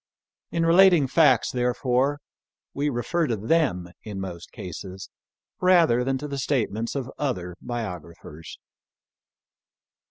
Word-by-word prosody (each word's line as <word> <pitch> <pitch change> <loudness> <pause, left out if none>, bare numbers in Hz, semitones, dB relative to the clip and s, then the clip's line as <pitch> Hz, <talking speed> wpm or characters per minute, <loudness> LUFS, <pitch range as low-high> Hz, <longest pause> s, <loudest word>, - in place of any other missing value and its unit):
In 165 0 0
relating 175 -2 +6
facts 135 -3 +3
therefore, 125 +3 0 0.5
we 145 +1 0
refer 155 +6 -1
to 115 - -1
them 105 - 0
in 105 -3 -7
most 90 -3 -7
cases, 95 +2 -8 0.5
rather 170 -10 +4
than 135 +1 0
to 150 +3 -6
the 140 -1 -4
statements 115 -4 -1
of 135 -1 -4
other 90 -11 -2
biographers. 85 -8 -7
125 Hz, 115 wpm, -25 LUFS, 95-145 Hz, 0.5 s, relating